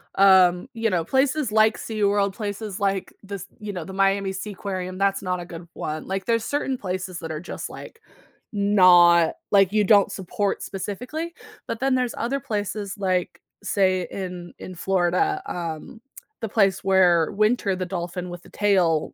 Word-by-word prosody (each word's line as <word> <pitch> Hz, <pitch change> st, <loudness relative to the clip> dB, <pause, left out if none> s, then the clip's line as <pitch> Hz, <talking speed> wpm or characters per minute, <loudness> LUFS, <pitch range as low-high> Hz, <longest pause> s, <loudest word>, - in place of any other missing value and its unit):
um, 185 Hz, 0 st, +5 dB
you 225 Hz, -1 st, 0 dB
know, 175 Hz, -4 st, 0 dB
places 265 Hz, -, +1 dB
like 220 Hz, 0 st, +4 dB
SeaWorld, 205 Hz, -2 st, 0 dB
places 205 Hz, -2 st, -5 dB
like 195 Hz, -1 st, -1 dB
this 200 Hz, -2 st, -7 dB
you 210 Hz, -1 st, -5 dB
know, 180 Hz, -4 st, -5 dB
the 190 Hz, -, -9 dB
Miami 195 Hz, 0 st, +1 dB
Seaquarium, 190 Hz, -1 st, -5 dB
that's 195 Hz, 0 st, +1 dB
not 180 Hz, -1 st, -2 dB
a 175 Hz, -, -6 dB
good 170 Hz, 0 st, -10 dB
1. 155 Hz, 0 st, -5 dB
Like, 190 Hz, 0 st, -3 dB
there's 230 Hz, -1 st, +1 dB
certain 280 Hz, -2 st, -1 dB
places 185 Hz, -3 st, -4 dB
that 165 Hz, -1 st, -6 dB
are 155 Hz, -, -4 dB
just, 175 Hz, -, -6 dB
like 460 Hz, -, -11 dB, 0.5 s
not 180 Hz, -5 st, +5 dB, 0.2 s
like 195 Hz, -2 st, +5 dB
you 215 Hz, 0 st, +3 dB
don't 200 Hz, -1 st, +5 dB
support 195 Hz, +1 st, -2 dB
specifically, 250 Hz, -, -5 dB, 0.4 s
but 230 Hz, -, -3 dB
then 270 Hz, 0 st, +2 dB
there's 250 Hz, -2 st, 0 dB
other 255 Hz, +4 st, -1 dB
places, 205 Hz, -5 st, -3 dB
like, 185 Hz, -2 st, -1 dB, 0.2 s
say 185 Hz, -2 st, +1 dB
in 180 Hz, -2 st, -6 dB
in 185 Hz, -, -8 dB
Florida, 195 Hz, -, +1 dB
um, 170 Hz, +6 st, -6 dB, 0.4 s
the 225 Hz, -, -3 dB
place 195 Hz, -3 st, +2 dB
where 180 Hz, -4 st, +4 dB
Winter 215 Hz, -2 st, +1 dB
the 185 Hz, -, -2 dB
dolphin 180 Hz, 0 st, -4 dB
with 175 Hz, 0 st, -9 dB
the -, -, -16 dB
tail 180 Hz, -7 st, +1 dB
195 Hz, 165 wpm, -24 LUFS, 180-215 Hz, 0.5 s, um